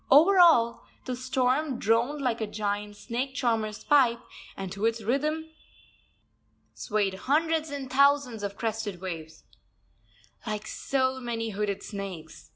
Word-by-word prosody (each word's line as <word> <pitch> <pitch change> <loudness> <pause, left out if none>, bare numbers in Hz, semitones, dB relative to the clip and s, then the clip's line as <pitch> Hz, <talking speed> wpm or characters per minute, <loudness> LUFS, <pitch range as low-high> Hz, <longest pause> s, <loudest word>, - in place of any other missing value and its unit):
Over 340 +8 +7
all, 240 -10 +5 0.2
the 255 - -3
storm 255 +2 0
droned 240 +7 +1
like 235 -3 0
a 220 - -1
giant 205 0 -3
snake 255 +5 -4
charmer's 225 -5 -1
pipe, 250 -5 +4 0.4
and 195 -2 -5
to 200 +3 -2
its 230 -1 -2
rhythm 305 +7 -1 1.2
swayed 205 -2 -1 0.2
hundreds 320 +1 +2
and 280 -2 -5
thousands 280 -3 +3
of 200 -1 -4
crested 220 -4 -3
waves, 165 -4 -7 1.0
like 215 0 -3
so 260 +2 -1
many 230 -2 -3
hooded 200 -1 -2
snakes. 190 -6 -8
235 Hz, 130 wpm, -28 LUFS, 210-275 Hz, 1.2 s, Over